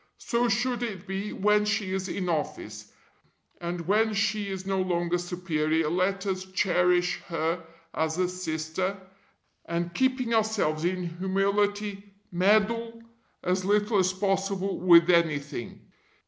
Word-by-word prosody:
So 240 0 0
should 240 +3 0
it 205 -6 -4
be 195 +2 -4
when 210 +1 +3
she 210 -3 -1
is 190 0 -2
in 180 +1 -3
office. 105 -10 -3 0.7
And 175 0 -4
when 210 +5 +2
she 205 0 0
is 190 -1 -5
no 195 -1 0
longer 175 -1 0
Superior 160 -3 -1
let 195 +3 0
us 190 -1 -2
cherish 180 -1 +1
her 165 +1 -1 0.3
as 160 +1 -1
a 180 0 +2
sister, 180 +2 -3 0.7
and 170 +1 -2
keeping 255 0 +1
ourselves 210 -8 +1
in 185 +1 0 0.2
humility, 200 +1 -1 0.2
meddle 215 +5 +1 0.4
as 185 +1 0
little 205 +2 +2
as 185 0 +3
possible 195 0 -1
with 170 -1 +7
anything. 145 -7 0
190 Hz, 130 wpm, -27 LUFS, 175-205 Hz, 0.7 s, with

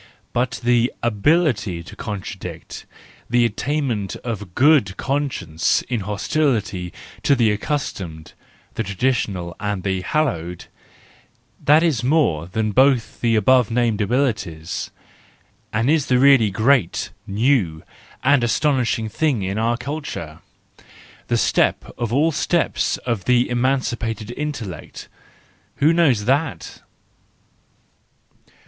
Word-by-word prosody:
But 120 0 -1
the 120 0 +3
ability 115 - +1
to - - -12
contradict, 105 -5 -7 0.4
the 120 0 +3
attainment 120 -3 -2
of 105 -7 -5
good 130 -9 +4
conscience 135 - -1
in 120 -3 -2
hostility 105 - -1 0.3
to 140 - +3
the 115 -4 +3
accustomed, 100 - -4 0.4
the - - -3
traditional 100 -4 -1
and 105 -3 -3
the 95 -1 -1
hallowed,—that 135 - -2
is 155 -8 +1
more 125 - +2
than 110 +3 -1
both 130 0 +2
the 115 -2 +2
above 120 +2 +4
named 115 -2 +1
abilities, 105 - -1 0.8
and 115 +3 0
is 150 -1 +2
the 125 - +3
really 135 -4 +5
great, 110 0 +1 0.2
new 100 - +1 0.4
and 140 -1 +4
astonishing 120 -1 +1
thing 125 -1 0
in 95 +3 -2
our 115 +1 +1
culture, 125 - -6 0.9
the - - +1
step - - +2
of 120 -2 -3
all 150 +6 +3
steps 165 +2 0
of 115 -6 -2
the 125 0 +3
emancipated 120 -3 -1
intellect: 120 - -6 0.7
who 155 +3 +3
knows 140 -11 +3
that 140 +4 -1
120 Hz, 110 wpm, -21 LUFS, 100-140 Hz, 0.9 s, really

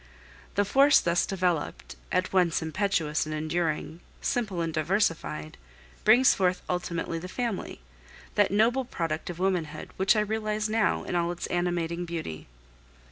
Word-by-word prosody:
The 205 - +3
force 275 +7 +6
thus 170 0 +1
developed 180 - -2 0.2
at 180 +1 0
once 175 -3 +2
impetuous 160 -3 0
and 155 - -3
enduring, 155 +1 -2 0.2
simple 210 -7 -1
and 165 -1 -2
diversified 155 - -1 0.4
brings 245 +5 +6
forth 185 -1 0
ultimately 170 -2 -2
the 180 - -7
family, 230 - -4 0.5
that - - +3
noble 230 +6 +3
product 165 -10 -3
of 175 - -5
womanhood, 180 -5 -2
which 190 +3 +4
I 215 - +3
realize 215 0 -1
now 220 0 +1
in - - -5
all 170 0 +1
its 175 - -5
animating 175 -1 -1
beauty. 160 - -5
175 Hz, 140 wpm, -28 LUFS, 165-205 Hz, 0.5 s, force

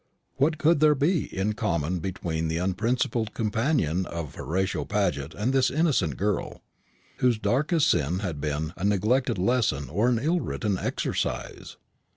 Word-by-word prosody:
What 155 +4 +2
could 155 +1 +3
there 150 0 +5
be 150 +4 +1
in 100 +3 -2
common 90 -5 -1
between 80 -2 -3
the 80 +1 -1
unprincipled 110 +4 -1
companion 110 - 0
of 85 -5 -5
Horatio 95 +3 -2
Paget 90 -9 -1
and 115 +6 -1
this 135 -1 +3
innocent 135 - +1
girl, 100 -1 -2 0.5
whose 125 -3 +2
darkest 145 +8 +1
sin 85 +1 0
had 90 -7 -4
been 75 +2 -2
a - - -7
neglected 105 +5 +2
lesson 95 - +1
or 105 +9 +2
an 120 - +2
ill 160 +9 +1
written 105 - -2
exercise? - - -3
105 Hz, 150 wpm, -26 LUFS, 85-125 Hz, 0.5 s, there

